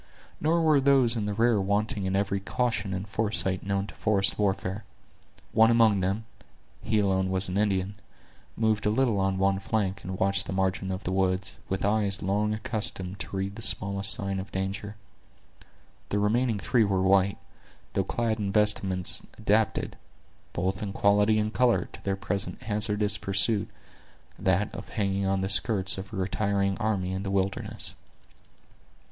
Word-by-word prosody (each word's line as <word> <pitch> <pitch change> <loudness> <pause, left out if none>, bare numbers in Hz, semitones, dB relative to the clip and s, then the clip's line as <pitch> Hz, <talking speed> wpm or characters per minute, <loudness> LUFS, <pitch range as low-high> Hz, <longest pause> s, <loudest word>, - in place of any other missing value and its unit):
Nor 165 +2 +2
were 155 -3 +4
those 135 -4 +4
in 105 -3 -2
the 105 - -1
rear 115 -1 +3
wanting 100 0 -1
in 95 - -1
every 100 0 0
caution 110 0 -1
and 95 +2 -4
foresight 105 -3 0
known 100 0 -1
to - - -10
forest 105 -1 +1
warfare. 100 0 -1 0.7
One 110 0 +5
among 115 -3 +4
them, 100 +4 -1 0.6
he 105 -1 +1
also 95 -1 +1
was 95 0 0
an 90 - -2
Indian, 100 -1 0 0.6
moved 110 -2 +1
a - - +4
little 115 -2 +2
on 95 0 0
one 95 0 +2
flank, 100 -1 -1
and 95 0 -5
watched 100 +2 +1
the - - -3
margin 95 0 -1
of 95 - -4
the 95 - -3
woods, 95 0 0 0.2
with 95 0 -1
eyes 100 -1 +2
long 105 +3 +1
accustomed 105 -3 -3
to 95 - -4
read 95 +1 -3
the 115 - -8
smallest 100 -2 +2
sign 100 -1 0
of 95 - -7
danger. 95 +2 -4 1.1
The 100 - 0
remaining 110 +3 +1
three 115 +3 +2
were 95 -2 +1
white, 95 +1 +3 0.6
though 95 - +1
clad 115 +2 -1
in 100 -2 -1
vestments 100 -3 +1
adapted, 110 0 0 0.5
both 95 +3 -2
in 100 -2 -4
quality 105 +2 +3
and 110 0 -1
color, 125 -2 +2
to - - -11
their 100 -1 0
present 100 0 -4
hazardous 105 -1 0
pursuit—that 95 - -1
of 100 - -8
hanging 100 -2 -1
on 95 0 +1
the 95 - -1
skirts 95 -2 +2
of 95 0 -8
a - - -7
retiring 100 +1 0
army 100 -4 -1
in 95 0 -3
the 100 - -4
wilderness. 95 0 -1
100 Hz, 165 wpm, -27 LUFS, 95-110 Hz, 1.1 s, One